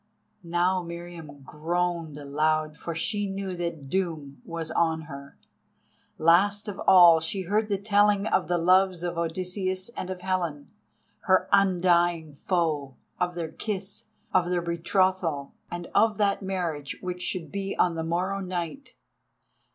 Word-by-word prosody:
Now 175 +2 +1
Meriamun 170 -4 -9
groaned 165 +1 -2
aloud, 155 +2 0
for 165 +2 -6
she 205 +5 -1
knew 195 -1 -4
that 170 -5 -4
doom 150 -6 -3
was 165 -1 -5
on 160 -1 +1
her. 140 -2 -10 0.8
Last 200 +6 +3
of 200 -2 -5
all, 175 -3 +8
she 175 +4 -2
heard 210 +4 0
the 200 - +1
telling 205 0 +3
of 190 - +1
the 175 - +1
loves 185 +1 +3
of 175 -1 -2
Odysseus 185 +3 -2
and 185 -6 -6
of 185 -1 -5
Helen, 175 -6 -2 0.5
her 185 -1 +3
undying 175 -4 +3
foe, 150 -4 -1 0.2
of 180 -1 0
their 165 -2 -4
kiss, 195 +1 -4 0.3
of 180 -1 +3
their 175 -1 0
betrothal, 170 -3 0 0.2
and 175 0 -5
of 215 0 +3
that 205 -1 +1
marriage 175 -7 -3
which 180 -1 -4
should 165 -6 -3
be 195 0 -3
on 175 - +3
the 165 0 -3
morrow 180 +4 -1
night. 185 - -5
175 Hz, 145 wpm, -27 LUFS, 160-190 Hz, 0.8 s, all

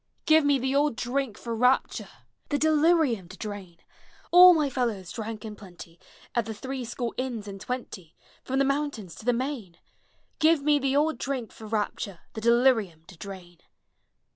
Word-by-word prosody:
Give 315 0 +5
me 285 -1 +3
the 265 +1 -1
old 290 -3 +2
drink 250 -1 -2
for 235 - -5
rapture, 250 +3 +1 0.4
The 290 - +1
delirium 310 - +2
to - - -11
drain, 200 -5 -7 0.5
All 360 0 +9
my 305 -2 +2
fellows 235 -9 -2
drank 220 -1 -6
in 215 -1 -7
plenty 175 -4 -13 0.3
At 235 -3 0
the 220 - -5
Three 265 +3 -5
Score 240 0 -4
Inns 245 -5 -4
and 195 -1 -8
Twenty 230 -9 -6 0.3
From 265 - -2
the 275 - +3
mountains 275 - -2
to - - -11
the 245 - +4
main! 240 -8 -4 0.6
Give 315 -2 +4
me 295 0 +3
the 270 0 0
old 305 +2 +1
drink 260 -5 -3
for 220 - -11
rapture, 210 -3 -3
The 220 - -6
delirium 230 -8 +3
to 185 - -12
drain! 175 -1 -10
240 Hz, 170 wpm, -27 LUFS, 205-280 Hz, 0.6 s, All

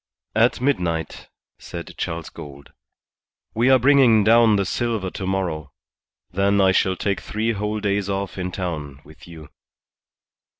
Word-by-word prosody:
"At 115 +3 +2
midnight," 90 - -2 0.3
said - - -8
Charles 80 -1 -4
Gould. 70 -1 -11 0.8
"We 120 +4 +2
are 130 - +7
bringing 130 -4 +5
down 115 0 +5
the 100 -1 0
silver 110 -3 -2
to 95 - -5
morrow. 85 -7 -3 0.6
Then 100 +2 +1
I 95 -1 +5
shall 95 0 +2
take 100 +1 -2
three 110 +2 -2
whole 105 0 -3
days 100 -1 -1
off 100 0 -3
in 90 0 -3
town 75 -7 -5
with 75 +3 -16
you." 80 -3 -12
100 Hz, 140 wpm, -22 LUFS, 85-110 Hz, 0.8 s, are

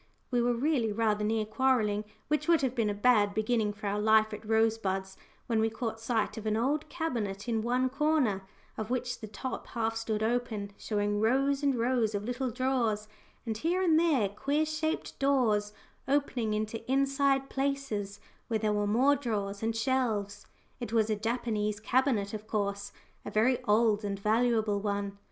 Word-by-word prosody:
We 245 -1 +2
were 240 0 +2
really 250 -3 +1
rather 210 -1 +1
near 215 0 0
quarrelling, 215 -3 +1 0.2
which 300 +1 0
would 335 -3 +4
have 255 -2 +1
been 230 -4 0
a - - 0
bad 205 -2 +3
beginning 220 -1 +1
for 210 +1 -10
our 205 +1 0
life 215 0 +4
at 210 - -7
Rosebuds, 220 -4 +1 0.3
when 230 -2 0
we 220 0 +2
caught 225 0 -4
sight 225 -1 -1
of 220 - -6
an 215 0 +1
old 285 +6 0
cabinet 235 - -3
in 225 -2 0
one 250 +3 +1
corner, 275 -7 +1 0.4
of 215 0 -4
which 250 0 -2
the 215 - -7
top 210 +5 -6
half 225 -1 -2
stood 220 -1 -2
open, 220 -3 -1
showing 205 -1 -1
rows 270 +5 +2
and 280 -2 +2
rows 235 -2 +1
of 205 - -2
little 245 +3 -2
drawers, 235 -4 0 0.4
and 220 -2 -3
here 350 +6 +1
and 325 -3 +4
there 300 -11 +3
queer 280 +9 0
shaped 310 +1 -3
doors 235 -7 +2 0.4
opening 265 -6 0
into 215 +2 -3
inside 275 0 +2
places, 270 -8 -2 0.3
where 225 - 0
there 215 -1 0
were 205 0 0
more 260 +7 +4
drawers 205 -7 -3
and 225 0 -1
shelves. 220 -4 -1 0.3
It 240 -3 -5
was 220 -1 +2
a - - +2
Japanese 215 -2 -1
cabinet, 225 -4 +1
of 215 0 -6
course 200 -1 -2 0.3
a - - -5
very 245 +4 +2
old 215 -1 +3
and 200 -1 -2
valuable 220 0 +2
one. 200 -1 -3
225 Hz, 175 wpm, -30 LUFS, 210-260 Hz, 0.4 s, would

